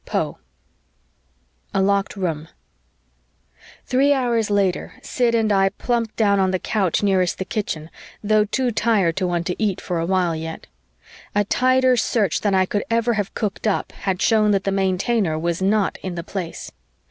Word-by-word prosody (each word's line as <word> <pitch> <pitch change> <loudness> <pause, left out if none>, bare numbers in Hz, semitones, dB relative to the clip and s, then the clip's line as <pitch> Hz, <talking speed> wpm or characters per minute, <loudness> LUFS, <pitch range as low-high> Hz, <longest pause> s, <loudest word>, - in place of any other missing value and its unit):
Poe - - -2 1.4
A - - +3
LOCKED 200 +1 +1
ROOM 165 -5 -2 1.4
Three 275 +3 +3
hours 240 -5 0
later, 200 -3 0
Sid 240 -2 +1
and 220 -2 +2
I 195 0 +4
plumped 230 +1 -2
down 200 -3 +3
on 190 -1 +2
the 185 - +1
couch 195 -1 0
nearest 185 -3 +2
the 190 - -4
kitchen, 170 -7 -4 0.3
though 210 0 +3
too 250 +3 0
tired 205 -7 +2
to 185 -2 0
want 175 -1 -1
to 180 - -3
eat 200 -4 0
for 175 -2 -3
a 165 - -2
while 180 -3 +1
yet. 160 0 -6 0.7
A 205 - +3
tighter 255 +3 +3
search 215 -6 +1
than 205 -2 +1
I 190 0 +4
could 205 +2 -2
ever 230 +1 +2
have 205 -3 -3
cooked 210 0 -2
up 210 - -1
had 190 -2 -2
shown 215 -2 +3
that 195 -2 +2
the 195 - 0
Maintainer 190 -1 0
was 170 +2 -2
not 200 +1 +1
in 185 -2 -5
the 170 - -4
Place. 175 -2 -6
200 Hz, 170 wpm, -21 LUFS, 185-220 Hz, 1.4 s, I